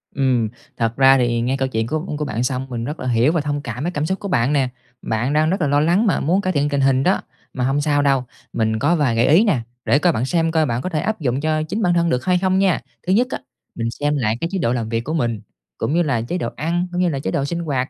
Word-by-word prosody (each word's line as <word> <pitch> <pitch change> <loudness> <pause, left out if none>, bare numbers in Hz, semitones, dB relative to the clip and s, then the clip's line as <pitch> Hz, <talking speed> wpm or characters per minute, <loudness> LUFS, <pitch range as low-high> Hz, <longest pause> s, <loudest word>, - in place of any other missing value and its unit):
Ừm. 130 -5 +1 0.3
Thật 115 0 0
ra 135 0 +6
thì 120 -2 +1
nghe 130 +3 0
câu 135 0 0
chuyện 110 -3 -2
của 155 +6 -1 0.2
của 150 - -2
bạn 120 -3 -2
xong 130 +1 -2
mình 120 -2 -4
rất 150 +5 -5
là 130 - -4
hiểu 120 +4 +3
và 165 -2 0
thông 145 0 -2
cảm 125 0 -5
cái 175 - -1
cảm 150 -3 -2
xúc 190 +4 -2
của 200 - -5
bạn 140 -7 +1
nè, 135 -3 +2 0.3
bạn 120 +5 -1
đang 155 +1 +3
rất 185 +1 -1
là 150 - +2
lo 145 +1 +3
lắng 175 +8 +3
mà 200 - +2
muốn 180 +7 +1
cải 185 -1 -1
thiện 145 -1 +1
tình 140 -1 0
hình 135 -1 +3
đó. 185 - +2 0.3
Mà 125 - -2
hông 135 +3 +1
sao 145 -1 +2
đâu, 135 -2 +2 0.3
mình 110 -1 0
có 145 +7 +2
vài 140 -8 +1
gợi 115 +2 +3
ý 165 +9 +6
nè, 195 - +2 0.3
để 140 - +3
coi 175 +1 +3
bạn 120 - -1
xem 165 +3 +1
coi 160 -1 +2
bạn 120 -3 -1
có 185 - -3
thể 160 -4 -1
áp 220 +6 -2
dụng 135 -3 -1
cho 155 0 0
chính 200 +8 -3
bản 180 -4 +2
thân 170 -1 +2
được 125 -2 -1
hay 180 -1 +3
không 190 0 +1
nha. 195 -2 +2 0.3
Thứ 185 - +3
nhất 240 +5 +3
á, - - -4 0.4
mình 115 -1 -2
xem 145 0 +1
lại 115 -4 0
cái 165 - 0
chế 195 - -1
độ 115 -6 +1
làm 115 -3 -2
việc 115 0 -1
của 155 - -4
mình, 120 -9 -1 0.4
cũng - - -1
như 175 +1 +3
là 135 -7 0
chế 125 +10 -3
độ 120 -9 -2
ăn, 170 +4 -1
cũng 180 0 -1
như 180 - +2
là 140 -4 -2
chế 95 - -3
độ 140 - 0
sinh 170 +4 -3
hoạt, 140 -6 -2
145 Hz, 305 wpm, -20 LUFS, 125-170 Hz, 0.4 s, ra